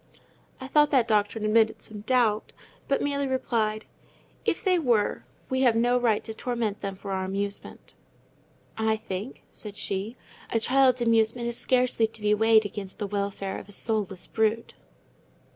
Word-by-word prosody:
I 260 Hz, -, -6 dB
thought 295 Hz, +2 st, +4 dB
that 255 Hz, -6 st, +3 dB
doctrine 210 Hz, 0 st, +1 dB
admitted 220 Hz, +1 st, +3 dB
some 210 Hz, -1 st, -8 dB
doubt, 225 Hz, -2 st, +1 dB, 0.3 s
but 275 Hz, -, +1 dB
merely 280 Hz, -1 st, 0 dB
replied—"If 230 Hz, -, -3 dB
they 370 Hz, -3 st, +3 dB
were, 235 Hz, -9 st, +1 dB, 0.2 s
we 260 Hz, 0 st, 0 dB
have 245 Hz, -4 st, +4 dB
no 245 Hz, +2 st, +3 dB
right 225 Hz, -4 st, +1 dB
to 220 Hz, -, -5 dB
torment 225 Hz, -3 st, -2 dB
them 195 Hz, -1 st, -4 dB
for 195 Hz, +1 st, -7 dB
our 190 Hz, 0 st, -1 dB
amusement." 200 Hz, +1 st, -5 dB, 0.9 s
"I 220 Hz, 0 st, +2 dB
think," 205 Hz, +4 st, -6 dB
said 210 Hz, -2 st, -8 dB
she, 200 Hz, +5 st, -3 dB, 0.3 s
"a 230 Hz, -, +1 dB
child's 255 Hz, +1 st, +3 dB
amusement 230 Hz, +1 st, +2 dB
is 235 Hz, -, -4 dB
scarcely 250 Hz, -3 st, +2 dB
to 220 Hz, 0 st, -12 dB
be 210 Hz, 0 st, +3 dB
weighed 220 Hz, 0 st, +4 dB
against 195 Hz, -1 st, -6 dB
the 210 Hz, -, -3 dB
welfare 200 Hz, -1 st, -3 dB
of -, -, -13 dB
a -, -, -11 dB
soulless 205 Hz, -3 st, -1 dB
brute." 220 Hz, +1 st, 0 dB
220 Hz, 160 wpm, -26 LUFS, 205-245 Hz, 0.9 s, thought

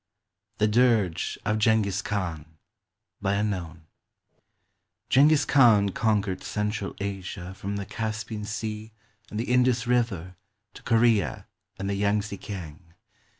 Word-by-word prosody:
THE 105 Hz, -, +3 dB
DIRGE 105 Hz, -7 st, +2 dB
OF 105 Hz, +1 st, +1 dB
JENGHIZ 105 Hz, -3 st, +2 dB
KHAN 85 Hz, -8 st, -3 dB, 2.7 s
[Jenghiz 145 Hz, +2 st, +5 dB
Khan 115 Hz, -7 st, +5 dB
conquered 105 Hz, -2 st, 0 dB
central 105 Hz, -1 st, -3 dB
Asia 95 Hz, -2 st, -5 dB
from 100 Hz, +1 st, -5 dB
the 100 Hz, -1 st, -4 dB
Caspian 110 Hz, 0 st, -4 dB
Sea 110 Hz, 0 st, -5 dB, 0.4 s
and 105 Hz, -, -4 dB
the 120 Hz, -, -2 dB
Indus 125 Hz, -1 st, +3 dB
River 110 Hz, -8 st, 0 dB, 0.4 s
to -, -, -12 dB
Korea 115 Hz, -4 st, +2 dB, 0.3 s
and 95 Hz, -, -4 dB
the 100 Hz, -, -1 dB
Yang 100 Hz, +1 st, +1 dB
tze 100 Hz, -1 st, -6 dB
kiang. 85 Hz, -7 st, -7 dB
105 Hz, 110 wpm, -26 LUFS, 100-115 Hz, 2.7 s, Jenghiz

